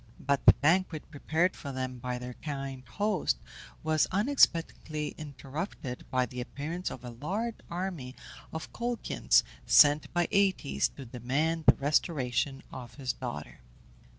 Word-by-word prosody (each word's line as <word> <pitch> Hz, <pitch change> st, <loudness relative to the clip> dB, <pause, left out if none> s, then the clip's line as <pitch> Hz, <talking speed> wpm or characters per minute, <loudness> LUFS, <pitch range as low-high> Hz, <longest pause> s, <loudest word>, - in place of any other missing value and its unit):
But 140 Hz, 0 st, 0 dB
the -, -, +12 dB
banquet 160 Hz, 0 st, +1 dB
prepared 165 Hz, +4 st, +1 dB
for 140 Hz, -, -6 dB
them 130 Hz, -1 st, -4 dB
by 125 Hz, 0 st, -3 dB
their 125 Hz, 0 st, -6 dB
kind 135 Hz, -2 st, -5 dB
host 200 Hz, -, 0 dB, 0.5 s
was 155 Hz, -1 st, +3 dB
unexpectedly 170 Hz, -, +2 dB
interrupted 140 Hz, -1 st, -6 dB
by 130 Hz, -1 st, +2 dB
the 125 Hz, 0 st, -6 dB
appearance 155 Hz, +8 st, -4 dB
of 125 Hz, -, -8 dB
a 120 Hz, -, -6 dB
large 200 Hz, -, -3 dB
army 170 Hz, -8 st, -4 dB, 0.4 s
of 160 Hz, -, -6 dB
Colchians, 240 Hz, 0 st, +2 dB, 0.2 s
sent 145 Hz, 0 st, +6 dB
by 175 Hz, 0 st, +2 dB
Aëtes 195 Hz, -7 st, +2 dB
to 135 Hz, -, -8 dB
demand 140 Hz, +7 st, -1 dB
the -, -, +9 dB
restoration 140 Hz, -2 st, 0 dB
of 120 Hz, -3 st, -8 dB
his 130 Hz, -4 st, -2 dB
daughter. 120 Hz, -, -6 dB
145 Hz, 135 wpm, -30 LUFS, 130-170 Hz, 0.5 s, the